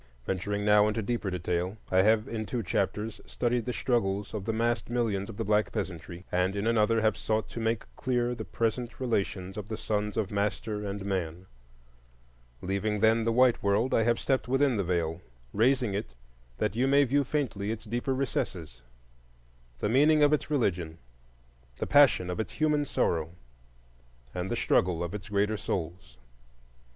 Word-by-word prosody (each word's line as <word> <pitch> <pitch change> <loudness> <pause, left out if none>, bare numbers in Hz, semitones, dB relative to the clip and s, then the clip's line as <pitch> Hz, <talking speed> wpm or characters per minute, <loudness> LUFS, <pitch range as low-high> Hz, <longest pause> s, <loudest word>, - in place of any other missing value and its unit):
Venturing 100 +2 -2
now 105 0 +5
into 110 +1 -1
deeper 115 -2 -2
detail, 90 +2 -2
I 95 0 +5
have 110 +2 +3
in 110 -2 -4
two 120 -3 -2
chapters 105 +4 -2
studied 120 -1 -1
the 125 - -1
struggles 105 -6 -1
of 105 -3 -4
the 115 - 0
massed 115 +2 0
millions 115 -5 -1
of 110 - -8
the 115 - -2
black 105 +1 +2
peasantry, 85 +1 -5
and 90 +2 +1
in 100 +1 -2
another 115 0 +3
have 110 -2 +2
sought 110 0 -1
to - - -6
make 115 0 0
clear 125 -1 0
the - - -5
present 115 +1 -2
relations 100 -6 -2
of 105 0 -6
the 110 - -3
sons 105 0 -2
of 110 -2 -1
master 105 +1 -2
and 100 -1 -4
man. 90 -3 -3 1.2
Leaving, 100 +3 -1
then, 110 +1 +4
the 115 - +2
white 125 +1 +4
world, 100 +5 +1
I - - +4
have 115 +1 +2
stepped 130 -2 0
within 135 0 +2
the 100 - 0
Veil, 85 -1 -1 0.3
raising 120 0 +2
it 95 -10 -4 0.4
that 105 -1 -1
you 125 +3 +2
may 140 +1 +5
view 140 +2 +2
faintly 125 -8 -2
its 115 +1 -4
deeper 120 +4 -1
recesses,—the 85 - -3 1.1
meaning 150 +6 +4
of 145 +1 +5
its 150 - 0
religion, 90 - 0 0.8
the - - -2
passion 135 -11 +5
of 90 - -4
its 110 - -3
human 150 -2 +1
sorrow, 85 - -1 1.0
and 90 +1 -3
the - - -1
struggle 90 -6 +1
of 85 +1 -4
its 105 0 -7
greater 105 +1 +1
souls. 85 -10 -5
105 Hz, 170 wpm, -29 LUFS, 95-120 Hz, 1.2 s, now